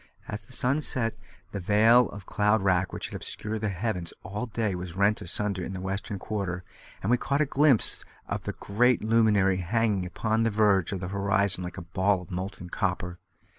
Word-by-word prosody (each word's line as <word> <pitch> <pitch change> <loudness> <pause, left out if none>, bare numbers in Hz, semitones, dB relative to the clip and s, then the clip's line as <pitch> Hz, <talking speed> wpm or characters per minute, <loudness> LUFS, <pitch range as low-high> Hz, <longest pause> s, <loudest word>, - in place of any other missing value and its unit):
As 105 0 -6
the - - -15
sun 130 +4 +3
set, 115 -6 +1 0.4
the 100 - -4
veil 110 +5 +5
of 100 -2 -10
cloud 105 0 +2
wrack 95 -1 +2
which - - -5
had - - -8
obscured 110 0 -4
the 110 - 0
heavens 90 -3 -3
all 105 +5 -4
day 110 -2 -1
was 90 -1 -6
rent 100 +2 +2
asunder 100 +2 -2
in 95 - -5
the 95 - -5
western 95 +2 -3
quarter, 95 -3 -3 0.4
and 105 - +1
we 125 - +5
caught 140 +3 -1
a 150 - +3
glimpse 140 -4 +4 0.2
of - - -4
the - - -2
great 120 +4 +1
luminary 105 -4 +3
hanging 100 0 0
upon 110 +4 0
the 115 - +3
verge 105 -4 +3
of 95 -2 -3
the 90 - -4
horizon 100 -1 +1
like 90 +1 -7
a 90 - -6
ball 95 +3 +1
of 90 - -14
molten 90 0 -5
copper. 90 -2 -2
100 Hz, 200 wpm, -27 LUFS, 95-110 Hz, 0.4 s, veil